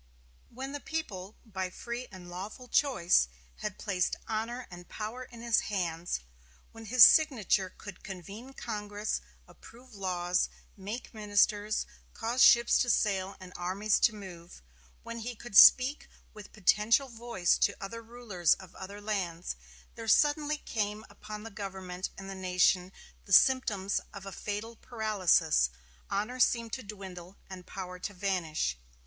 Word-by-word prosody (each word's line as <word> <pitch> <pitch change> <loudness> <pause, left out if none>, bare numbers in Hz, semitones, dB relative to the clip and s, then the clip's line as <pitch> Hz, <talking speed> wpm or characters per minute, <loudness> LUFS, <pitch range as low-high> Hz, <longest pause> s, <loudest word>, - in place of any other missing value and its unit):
When 265 +3 -6
the 290 - -5
people, 220 -12 -5
by 190 -4 -4
free 240 +6 -6
and 185 -2 -11
lawful 195 +8 -7
choice, 180 - +3 0.3
had - - -5
placed 180 -3 0
honor 230 +3 -3
and 175 0 -11
power 225 +4 -5
in 235 -2 -12
his 235 -2 +3
hands; 175 - -2 0.5
when 225 0 -11
his 235 +2 +7
signature 225 - +5
could 205 -2 -10
convene 200 +7 -9
Congress, 210 -1 -3 0.3
approve 245 +1 -16
laws, 180 -2 0 0.3
make 210 +7 -7
ministers, 210 0 +1 0.3
cause 235 +3 -1
ships 235 0 +7
to 245 - +1
sail 195 -4 +1
and 185 -1 -11
armies 195 +4 +1
to 220 - +3
move; 175 - -11 0.4
when 230 0 -6
he 240 +2 -5
could 225 -1 -10
speak 260 +7 +7 0.2
with 210 -2 -11
potential 215 +6 +3
voice 230 -7 0
to - - +2
other 230 +4 -6
rulers 225 -7 0
of 185 -2 -14
other 200 +2 -8
lands, 185 -5 -3 0.4
there 225 -1 -8
suddenly 295 +5 +3
came 210 -4 -3
upon 210 0 -9
the 225 - -8
government 190 -2 -5
and 195 - -8
the 195 - -5
nation 185 0 +2 0.3
the 195 - -3
symptoms 205 -6 +4
of 200 -1 -8
a 195 - -6
fatal 210 +4 -5
paralysis; 190 - +2 0.4
honor 215 +6 -2
seemed 230 -2 +2
to 260 - -3
dwindle 190 -4 -9
and 185 -1 -9
power 180 -1 -7
to 205 +2 -5
vanish. 165 - -1
205 Hz, 145 wpm, -30 LUFS, 185-230 Hz, 0.5 s, his